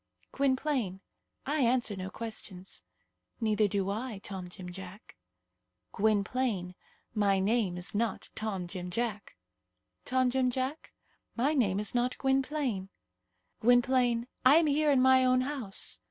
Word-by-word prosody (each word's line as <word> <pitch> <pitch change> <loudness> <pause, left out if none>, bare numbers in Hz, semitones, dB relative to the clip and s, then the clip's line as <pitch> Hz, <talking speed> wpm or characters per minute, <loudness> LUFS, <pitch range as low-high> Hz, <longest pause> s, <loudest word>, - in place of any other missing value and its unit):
"Gwynplaine, 260 -7 0 0.5
I 295 +2 0
answer 240 -3 +2
no 190 0 -5
questions." 195 -4 -6 0.6
"Neither 215 -2 +2
do 195 -1 -1
I, 225 +1 -4
Tom 190 -2 -7
Jim 180 0 -8
Jack." 190 +3 -11 0.8
"Gwynplaine, 205 -2 0 0.4
my 200 -3 +2
name 195 -2 +1
is 180 +1 -3
not 215 -1 -2
Tom 200 -5 -3
Jim 180 0 -6
Jack." 210 +1 -3 0.7
"Tom 255 -1 +1
Jim 260 0 +2
Jack, 260 +5 -3 0.4
my 270 +6 +2
name 205 -9 +2
is 210 -1 0
not 245 +1 0
Gwynplaine." 265 -7 0 0.7
"Gwynplaine, 245 0 +3 0.2
I 260 +3 +7
am 330 0 +5
here 300 +1 +2
in 265 -3 +4
my 260 0 +6
own 255 0 +4
house." 255 -7 -2
230 Hz, 130 wpm, -30 LUFS, 195-260 Hz, 0.8 s, I